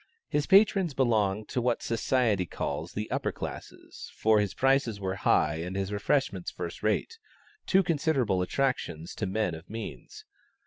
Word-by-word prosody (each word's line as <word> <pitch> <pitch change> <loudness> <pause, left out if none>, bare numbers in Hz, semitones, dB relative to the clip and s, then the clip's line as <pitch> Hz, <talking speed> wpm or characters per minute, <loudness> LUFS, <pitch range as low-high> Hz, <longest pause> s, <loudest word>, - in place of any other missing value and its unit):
His 150 0 -1
patrons 195 -5 +4
belonged 110 -5 +1
to 125 - -1
what 120 -1 0
society 115 -5 +1
calls 80 +3 -4
the 105 +1 -3
"upper - - -1
classes," - - -8
for 110 -1 +3
his 105 -2 -1
prices 135 -5 +2
were 95 -1 -2
high 75 -4 +2
and 90 +3 -5
his 100 +1 -2
refreshments 100 -3 0
first 85 -1 -6
rate; 450 - -1 0.5
two 190 +1 +4
considerable 145 - +1
attractions 90 - -1
to 105 - -3
men 95 -2 0
of 80 +2 -10
means. 105 - -8
110 Hz, 150 wpm, -28 LUFS, 95-135 Hz, 0.5 s, patrons